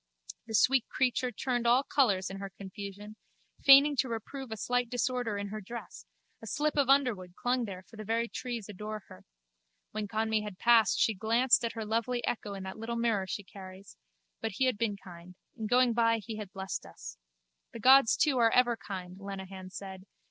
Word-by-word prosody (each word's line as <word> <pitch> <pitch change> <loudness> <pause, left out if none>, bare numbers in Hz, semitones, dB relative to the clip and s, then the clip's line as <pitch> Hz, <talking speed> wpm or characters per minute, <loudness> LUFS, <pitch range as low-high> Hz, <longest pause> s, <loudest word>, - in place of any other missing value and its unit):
The 220 - -3
sweet 260 +3 +3
creature 255 -1 0
turned 245 +1 -1
all 245 +3 +5
colours 200 -11 +1
in 195 - -6
her 195 0 -6
confusion, 200 +2 -9 0.5
feigning 280 +1 +8
to 255 - +1
reprove 235 +3 -6
a 220 - -4
slight 245 +2 0
disorder 245 -3 -1
in 200 0 -4
her 215 +1 -6
dress: 235 +4 -9 0.3
a - - -9
slip 300 0 -1
of 280 -3 +2
underwood 230 -11 +2
clung 245 0 0
there 190 -3 -8
for 220 - -16
the 215 - -6
very 230 +2 0
trees 235 -3 -5
adore 210 +1 -6
her. 95 - -14 0.7
When 215 -1 -4
Conmee 220 0 0
had 210 -3 -7
passed 230 0 +4
she 225 - +3
glanced 230 +6 +3
at 230 - -2
her 225 -1 -5
lovely 235 +3 -1
echo 210 -3 -3
in 195 - -7
that 190 +3 -7
little 230 +1 -4
mirror 225 -5 0
she 205 - -4
carries. 190 0 -12 0.5
But 225 -2 -3
he 260 - +1
had 255 -5 0
been 210 -3 0
kind. 180 -1 -13 0.2
In 220 -3 -4
going 245 +1 +4
by 230 0 +3
he 215 0 -7
had 210 -3 -7
blessed 190 0 -5
us. - - -11 0.5
The 230 - -8
gods 260 0 +6
too 285 -5 +2
are 230 -1 +5
ever 240 0 +3
kind, 185 -3 -8
Lenehan 190 -1 -7
said. 190 0 -9
220 Hz, 195 wpm, -30 LUFS, 195-245 Hz, 0.7 s, feigning